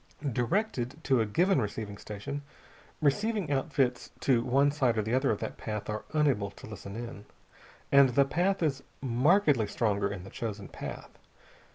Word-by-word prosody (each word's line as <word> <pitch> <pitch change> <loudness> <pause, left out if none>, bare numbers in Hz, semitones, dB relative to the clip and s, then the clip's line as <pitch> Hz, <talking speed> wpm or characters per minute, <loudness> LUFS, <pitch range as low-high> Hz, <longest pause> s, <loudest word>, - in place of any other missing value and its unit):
Directed 130 - 0
to 130 -4 +3
a 110 - 0
given 175 - +3
receiving 105 -1 -4
station, 105 +8 -5 0.6
receiving 205 +3 +1
outfits 135 -3 0
to 125 -4 +3
one 135 +3 +3
side 130 -6 +1
or 110 - +2
the 110 +3 -2
other 130 +2 +3
of 105 - +2
that - - -4
path 105 -1 -4
are 105 0 -4
unable 140 -10 +2
to - - -13
listen 105 -2 -8
in, 115 -3 -7 0.7
and 140 -1 +7
the 140 +3 +3
signal 175 +3 +1
is 135 -2 -3 0.2
markedly 135 - +3
stronger 100 -2 0
in 95 -3 -6
the 95 - -11
chosen 105 -3 -5
path. - - -8
125 Hz, 165 wpm, -30 LUFS, 110-145 Hz, 0.7 s, and